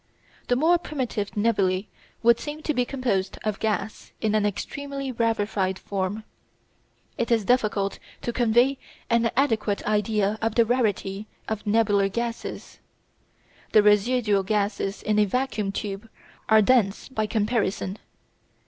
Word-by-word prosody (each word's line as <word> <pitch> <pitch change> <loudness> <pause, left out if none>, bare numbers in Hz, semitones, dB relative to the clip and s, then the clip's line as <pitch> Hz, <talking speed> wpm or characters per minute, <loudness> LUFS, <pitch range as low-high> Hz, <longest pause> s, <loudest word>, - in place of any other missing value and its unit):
The 245 - +2
more 330 +6 +4
primitive 255 - -3
nebulæ 200 -3 +1 0.4
would 235 0 +5
seem 300 +1 -6
to 305 - 0
be 250 -2 +1
composed 235 -8 -1
of 215 -2 -2
gas 215 -1 -2
in 215 -1 0
an 210 -1 +3
extremely 275 +6 -4
rarified 210 -5 0
form. 200 +2 -3 1.0
It 235 - 0
is 225 -4 +2
difficult 210 -5 +1 0.2
to 240 - -2
convey 240 +3 +3 0.3
an 235 0 +3
adequate 225 -7 +1
idea 210 0 +1
of 225 -1 0
the 235 - +5
rarity 215 -4 -1 0.2
of 215 -1 -4
nebular 205 -2 +3
gases. 235 +2 -5 0.9
The 215 - +7
residual 210 0 +3
gases 200 0 -1
in 210 0 +1
a 210 - +5
vacuum 215 -2 -1
tube 205 +2 -5 0.4
are 220 -1 +6
dense 215 -4 +2
by 220 -5 -2
comparison. 210 -3 -1
215 Hz, 130 wpm, -25 LUFS, 205-240 Hz, 1.0 s, The